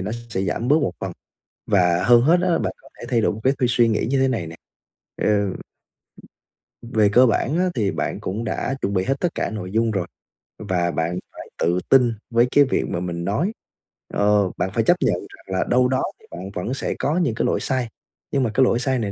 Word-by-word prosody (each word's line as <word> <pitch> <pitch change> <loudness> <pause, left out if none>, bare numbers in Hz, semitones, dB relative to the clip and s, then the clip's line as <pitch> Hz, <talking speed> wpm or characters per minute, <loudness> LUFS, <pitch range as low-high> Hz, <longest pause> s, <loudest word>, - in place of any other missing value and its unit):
nó 95 +3 -3 0.2
sẽ 95 -4 -2
giảm 100 +6 -2
bớt 145 - +5
một 95 - -1
phần - - -4 0.6
và 90 -3 +3
hơn 120 0 +6
hết 165 +8 +4
á 185 - 0
là 170 - +2
bạn - - -2
có - - -18
thể - - -7
thay 120 -3 +2
đổi - - +2
một 105 - -7
cái 130 - +3
tư 125 - +1
suy 120 -1 +4
nghĩ 110 - 0
như 135 +1 +2
thế 135 - +3
này 115 -11 -2
nè, 80 - -9 0.7
ờ, - - +2 1.6
về 110 -3 +2
cơ 125 +3 +6
bản 130 +6 +1
á 185 0 +2
thì 105 -6 0
bạn - - -3
cũng 105 +5 -4
đã 125 +3 -2
chuẩn 100 - -1
bị 95 -1 +1
hết 135 - +1
tất 175 -2 -1
cả - - -2
nội 95 -4 -6
dung 115 +1 +2
rồi 95 -5 -1 0.5
và 90 -4 -1
bạn 85 +2 -2
phải - - -10
tự 85 +2 +1
tin 125 -3 +5 0.2
với 120 +1 +3
cái 145 - +6
việc 130 - 0
mà - - -2
mình 85 -1 -4
nói 140 - 0 0.6
ờ, 100 -2 +2
bạn 95 - -1
phải 115 - +1
chấp - - +4
nhận - - +2
rằng - - -11
là - - +2
đâu 125 +1 +4
đó 130 0 0 0.2
thì - - -21
bạn 95 +3 -7
vẫn 95 +8 -3
sẽ 135 - -2
có 150 +5 0
những 145 -11 +1
cái - - 0
lỗi - - +1
sai, 130 -3 -1 0.4
nhưng 135 -2 +1
mà 115 - 0
cái 130 - +4
lỗi 120 -2 +2
sai 130 0 0
này 105 -3 -2
115 Hz, 240 wpm, -22 LUFS, 95-130 Hz, 1.6 s, hơn